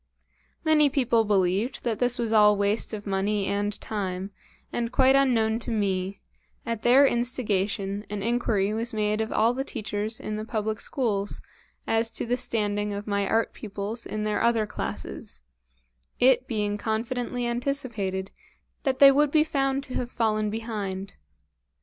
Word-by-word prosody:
Many 310 -2 +4
people 245 -5 +2
believed 200 +4 +1
that 230 -3 -1
this 245 0 +2
was 230 -2 -1
all 210 -1 +6
waste 205 +2 +1
of 210 -2 -6
money 200 +1 0
and 205 +1 -1
time, 195 -2 -4 0.4
and, 235 -1 -1
quite 265 +1 +5
unknown 230 -5 +3
to 240 - -5
me, 195 -3 -1 0.5
at 230 -2 -3
their 260 +4 +6
instigation 210 -5 -1
an 205 -1 -4
inquiry 220 -3 +1
was 225 +1 -2
made 210 0 +1
of 220 - -3
all 225 +2 +3
the 265 +2 -2
teachers 215 -3 -4
in 215 0 -4
the 215 - -4
public 220 -1 -2
schools 205 -6 -1 0.5
as 225 0 +2
to - - -1
the 240 +1 +1
standing 210 -4 -1
of 205 +1 -5
my 200 -1 0
art 225 +2 +1
pupils 210 +2 -5
in 215 0 -3
their 210 0 0
other 230 -2 +3
classes, 65 - -6 0.8
it 255 0 +4
being 210 -2 -1
confidently 240 +3 -2
anticipated 235 -7 -2 0.5
that 265 -2 0
they 275 0 +9
would 290 +2 +3
be 305 +1 +4
found 275 -3 0
to 260 - -7
have 245 - -2
fallen 215 -3 0
behind. 205 -3 -5
220 Hz, 155 wpm, -26 LUFS, 205-245 Hz, 0.8 s, they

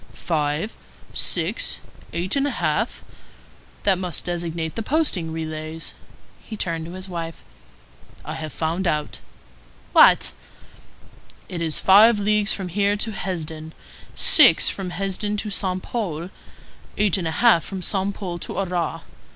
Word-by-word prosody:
"Five, 155 +4 -2 0.4
six, - - 0 0.3
eight 175 +6 -1
and 280 0 +2
a - - -4
half? - - -1 0.8
That 195 -3 +3
must 180 -4 -3
designate 170 -2 -3
the 225 - -2
posting 220 - 0
relays." 160 0 -6 0.5
He 215 - -8
turned 165 -4 -2
to 170 - -8
his 185 +1 -7
wife:— 165 -2 -6 0.8
"I - - -5
have 155 -1 -6
found 170 +5 -2
out." 150 -2 -2 0.7
"What?" - - +6 1.2
"It 175 -2 -5
is 160 -2 0
five 210 +4 +6
leagues 210 0 +2
from 190 -3 -2
here 200 +3 +1
to 215 +2 -2
Hesdin, 160 -5 -5 0.4
six - - +7
from 190 -2 -4
Hesdin 195 +3 -2
to 210 0 -3
Saint 185 -2 -2
Pol, 180 -7 -4 0.7
eight 205 -2 +3
and 170 - -2
a 160 - -3
half 230 -9 +5
from 190 -2 -6
Saint 195 +1 +1
Pol 175 -4 -5
to - - -6
Arras. 175 -3 -2
180 Hz, 140 wpm, -23 LUFS, 165-205 Hz, 1.2 s, six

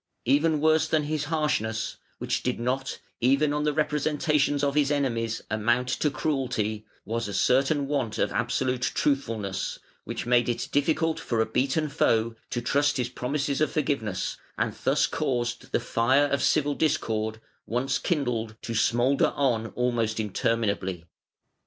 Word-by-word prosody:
Even 150 +4 +3
worse 155 +1 +3
than 155 -1 +1
his 150 0 -2
harshness 145 -9 -1 0.2
(which - - -1
did - - -2
not, 130 +3 -2 0.2
even 140 +4 +3
on 150 0 0
the 150 - +3
representations 150 -1 +1
of 140 -1 +2
his 145 -1 +2
enemies, 115 -6 -1
amount 120 +4 +1
to 150 +4 +1
cruelty) 125 -7 -2 0.2
was 115 +2 -2
a 100 - -4
certain 135 +4 +2
want 135 -7 -1
of - - +1
absolute 125 +1 0
truthfulness, 115 -9 -1 0.3
which - - -5
made 120 0 +3
it 120 0 -2
difficult 160 +3 +1
for 115 - -2
a 110 - +3
beaten 135 +7 0
foe 115 -6 +1
to 120 - -2
trust 145 +3 +2
his 125 -2 -1
promises 140 +3 -2
of 155 - +2
forgiveness, 130 -10 -1 0.2
and - - 0
thus - - +3
caused 120 -2 -2
the - - +2
fire 120 +4 +2
of 140 -2 0
civil 145 -1 +2
discord, 110 -8 0 0.3
once 125 +3 0
kindled, 120 -9 -1
to 115 - -4
smoulder 120 +5 +2
on 120 -5 +1
almost 115 -3 0
interminably. 100 -4 -1
130 Hz, 150 wpm, -27 LUFS, 115-145 Hz, 0.3 s, Even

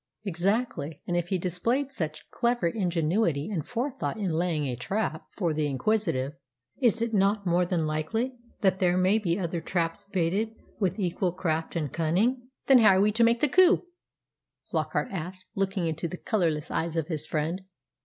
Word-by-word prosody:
"Exactly. 195 - -1
And 175 - -1
if 175 -1 0
he 190 - 0
displayed 230 - -1
such 155 - -4
clever 240 -3 +1
ingenuity 170 -2 0
and 170 -7 -1
forethought 250 - -3
in 200 -5 -1
laying 160 -2 0
a 125 -3 -2
trap 175 - -2
for 170 -6 -1
the 150 -1 0
inquisitive, 145 -2 0 0.5
is 230 -2 +3
it 230 -1 -2
not 200 0 +2
more 175 0 +2
than 170 -3 0
likely 190 +12 -1 0.3
that 190 -1 +3
there 180 -1 +3
may 190 +4 +4
be 175 -4 0
other 170 -3 -2
traps 170 +3 -2
baited 200 +4 0 0.2
with 195 0 0
equal 180 -1 0
craft 165 -3 -2
and 150 -5 -2
cunning?" 220 +11 +1 0.2
"Then 265 -2 +7
how 215 -4 +7
are - - +3
we 210 +1 +4
to 230 +3 +3
make 230 +1 +3
the 300 - +5
coup?" 370 +6 +5 0.9
Flockart - - -1
asked, 185 +1 -5
looking 195 -3 -1
into 165 +1 -2
the 180 +2 -6
colourless 165 -8 0
eyes 165 0 -1
of 165 -2 0
his 160 -4 -3
friend. 160 +4 -1
185 Hz, 175 wpm, -28 LUFS, 165-215 Hz, 0.9 s, Then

